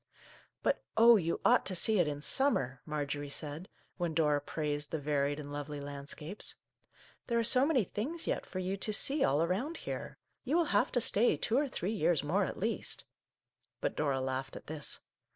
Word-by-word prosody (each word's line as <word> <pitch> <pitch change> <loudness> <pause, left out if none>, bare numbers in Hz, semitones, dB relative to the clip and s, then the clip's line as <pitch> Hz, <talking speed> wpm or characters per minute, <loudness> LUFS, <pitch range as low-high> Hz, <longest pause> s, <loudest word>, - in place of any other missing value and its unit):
" - - -28
But - - +1 0.2
oh, 230 +1 +8
you 170 -5 0
ought - - +5
to 185 - -1
see 215 +3 +5
it 175 - +3
in 145 0 -4
summer! 135 - +1
" - - -47
Marjorie 145 -1 -3
said, 150 +4 -6 0.3
when 175 -4 -2
Dora 150 -2 +2
praised 150 0 -3
the 160 - -2
varied 145 0 -1
and 145 -1 -7
lovely 145 0 -5
landscapes. 145 +6 -4 0.4
" - - -28
There 235 - 0
are 230 - +2
so 255 +4 +6
many 275 -8 +3
things 285 - -4
yet - - -1
for - - -8
you 185 +1 -2
to 215 +2 -3
see 275 +7 +3
all 145 +4 +3
around 220 - -2
here. - - -5 0.3
You 275 +5 -1
will 345 - +3
have 205 - +3
to 245 - +2
stay 225 +2 +3
two 230 - 0
or 285 +2 +2
three 215 -5 -3
years 170 -6 +1
more 185 +7 +1
at - - -6
least! 225 +4 0 0.4
" - - -44
But - - -2
Dora 140 -3 0
laughed 130 0 -3
at - - -9
this. 150 -2 -2
165 Hz, 205 wpm, -32 LUFS, 145-220 Hz, 0.4 s, oh